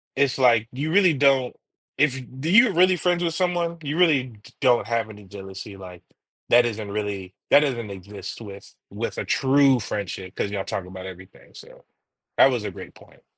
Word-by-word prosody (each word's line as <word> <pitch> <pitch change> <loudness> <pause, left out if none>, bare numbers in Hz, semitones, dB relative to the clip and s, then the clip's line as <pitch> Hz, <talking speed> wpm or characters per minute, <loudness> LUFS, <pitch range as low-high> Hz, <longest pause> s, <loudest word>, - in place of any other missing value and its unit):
it's 140 0 +1
like 120 -3 +4
you 145 +5 -3
really 185 -2 +4
don't, 135 -2 +2 0.4
if 135 -3 +2 0.2
do 155 - -3
you're 215 +2 +6
really 185 +2 +4
friends 175 0 0
with 165 -1 -1
someone, 175 -1 -1
you 145 +2 -3
really 155 -7 +4 0.2
d 125 - -15
don't 125 -4 +3
have 115 -2 -1
any 105 -1 -12
jealousy, 95 0 -10
like, 90 -2 -11 0.5
that 120 0 +6
isn't 110 -3 -4
really, 100 -3 -4 0.2
that - - +8
doesn't 120 -8 -2
exist 100 +4 -9
with 100 -2 -11 0.2
with - - -5
a - - -3
true 135 -1 +3
friendship 95 -3 -5
cause 100 - -2
y'all 100 -1 -3
talk 95 -2 -4
about 95 0 -9
everything, 95 0 -13
so - - -15 0.5
that 135 - +6
was 120 -4 -2
a - - -4
great - - -11
point. - - -20
120 Hz, 190 wpm, -23 LUFS, 100-150 Hz, 0.5 s, that